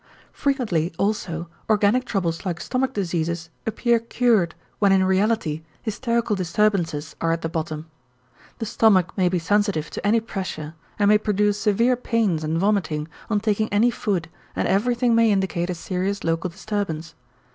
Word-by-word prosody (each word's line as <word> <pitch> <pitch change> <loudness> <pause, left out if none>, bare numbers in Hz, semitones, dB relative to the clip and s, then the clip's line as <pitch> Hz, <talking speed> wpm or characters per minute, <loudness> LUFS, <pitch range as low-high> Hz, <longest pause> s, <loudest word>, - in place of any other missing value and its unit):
Frequently 220 - 0
also 175 -5 -1 0.2
organic 215 +4 +3
troubles 175 -8 -1
like 175 -4 -3
stomach 255 +5 -1
diseases 170 -4 -2 0.2
appear 235 +1 +2
cured 225 -7 +1 0.2
when 200 -2 +4
in 190 -1 +4
reality 190 -4 +1 0.2
hysterical 235 -1 0
disturbances 175 -5 0
are 165 - +2
at 165 0 -1
the - - 0
bottom. 160 -1 -4 0.7
The 225 - -3
stomach 200 -5 +3
may 185 -3 +2
be 180 - 0
sensitive 190 -2 0
to - - -6
any 225 +2 +4
pressure 185 -8 -5 0.2
and 205 - +3
may 210 0 +6
produce 210 -1 +1
severe 230 +4 +3
pains 225 -9 0
and 155 +1 -1
vomiting 165 -6 0 0.2
on 210 -2 +1
taking 215 0 +1
any 220 +4 +3
food 190 -9 -1 0.3
and - - 0
everything 240 +4 +2
may 230 -1 +5
indicate 190 -3 0
a 180 - -1
serious 185 +3 -2
local 165 +2 0
disturbance. 175 -4 -4
200 Hz, 155 wpm, -23 LUFS, 170-220 Hz, 0.7 s, may